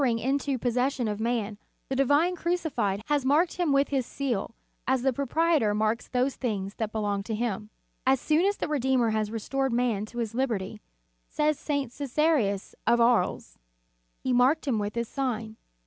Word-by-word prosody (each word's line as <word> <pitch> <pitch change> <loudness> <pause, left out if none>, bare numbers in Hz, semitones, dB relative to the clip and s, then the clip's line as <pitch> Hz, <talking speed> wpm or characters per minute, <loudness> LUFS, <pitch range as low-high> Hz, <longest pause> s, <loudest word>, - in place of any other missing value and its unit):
321 240 -2 +1
ing 270 - +3 0.2
into 265 - +1
possession 245 +1 0
of 210 -1 -3
man, 220 -3 -1 0.3
the 265 - -2
Divine 290 +7 +3
Cruci 345 -2 -1
fied 205 -4 -1
has 295 -2 +1
marked 305 +7 +2
him 350 -5 +1
with 275 0 +3
his 270 -2 +1
seal, 240 -4 -3 0.3
as 260 -1 +2
the 265 -1 +2
proprietor 280 -4 +2
marks 215 +2 0
those 255 +2 0
things 200 -5 -2
that 220 -1 -2
belong 205 -2 -1
to 220 +2 -4
him. 215 -2 -2 0.3
"As 265 0 +3
soon 310 +5 +2
as 405 - 0
the - - -2
Redeemer 260 -5 +2
had 215 -1 0
restored 265 +4 -1
man 235 -4 0
to 240 - -11
his 230 -2 -2
liberty," 220 -5 -2 0.5
says 300 -1 +1
St. 285 -5 -2
Csesarius 275 -7 0
of 235 +1 +4
Aries, 225 - +1 0.6
"He 260 - +1
marked 265 +6 +3
him 235 -5 +1
with 205 +1 -3
His 235 -1 -1
sign. 230 -5 -3
245 Hz, 180 wpm, -27 LUFS, 220-275 Hz, 0.6 s, of